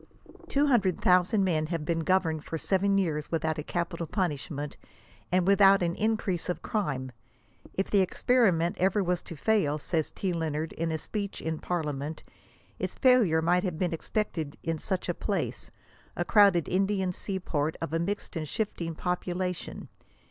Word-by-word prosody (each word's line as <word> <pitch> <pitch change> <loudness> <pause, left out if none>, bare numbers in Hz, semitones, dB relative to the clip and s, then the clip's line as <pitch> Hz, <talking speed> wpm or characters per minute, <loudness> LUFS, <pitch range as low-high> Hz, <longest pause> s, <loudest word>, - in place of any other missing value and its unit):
Two 285 +1 +2
hun 260 -5 +5
9^1 - - -7
dred 185 -3 -1
thousand 185 +3 +4
men 155 -4 +1
have 165 -2 -3
been 165 +1 0
governed 165 -3 +1
for 165 - -4
seven 195 +3 +1
years 155 -6 -1
without 160 -1 0
a - - -3
capital 170 0 -3
punishment, 150 -5 -2 0.6
and 180 0 +3
without 195 -1 +6
an 170 -1 0
increase 210 -4 -1
of 180 - -3
crime." 140 - -2 0.3
<' - - -24
If 195 - -1
the 200 - +5
experiment 185 -4 +2
ever 195 +2 +2
wa§i 180 -1 0
to 170 - -7
fail," 155 -3 +1
says 160 +1 -1
T. 190 -2 -2
Lennard, 160 -1 -2
in 165 0 -2
a 160 - 0
speech 200 +4 -4
in 160 -1 -3
par 175 -2 -1
liament, 145 -2 -3 0.2
•• - - -14 0.6
its - - -3
failure 225 - +4
might 180 +2 +3
have 180 -5 -2
been 175 0 0
expected 165 -4 -3
in 165 -1 -2
such 190 +1 -2
a - - 0
place - - -3 0.2
— - - -30
a - - -1
crowded 200 -6 +5
Indian 190 0 +1
sea 190 +1 -4
port, 155 -3 -1
of 165 -2 -4
a 165 - +1
mixed 195 +4 -3
and 155 -2 -3
shifting 170 -6 -3
population." 180 +1 -3
175 Hz, 185 wpm, -28 LUFS, 160-195 Hz, 0.6 s, without